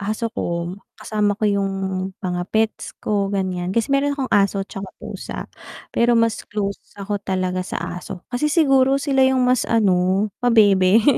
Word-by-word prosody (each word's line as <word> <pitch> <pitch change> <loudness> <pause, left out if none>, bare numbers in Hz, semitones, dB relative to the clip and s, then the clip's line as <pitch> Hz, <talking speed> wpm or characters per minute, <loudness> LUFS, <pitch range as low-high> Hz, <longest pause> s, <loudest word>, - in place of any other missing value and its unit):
aso 220 +3 -2
ko, 170 0 -3 0.2
kasama 210 -2 -1
ko 215 - -2
yung 200 -1 +1 0.5
mga 180 -1 -1
pets 220 0 -1
ko 200 -2 +1
ganiyan. 185 -3 -2
Kasi 230 +8 0
meron 280 +1 +1
akong 265 -3 -3
aso 195 -1 +2
'tsaka 195 -1 -7
pusa, - - -7 0.5
pero 235 0 +3
mas 230 -1 +2
close 200 -1 -3 0.2
ako 205 0 -3
talaga 185 -1 -1
sa 180 -1 -5
aso, 185 -1 -9
kasi 250 +5 +1
siguro 275 -4 +4
sila 275 -1 +1
yung 260 -1 +2
mas 250 0 +2
ano 195 -2 +2
pabebe. 210 -3 +5
205 Hz, 155 wpm, -21 LUFS, 190-240 Hz, 0.5 s, pabebe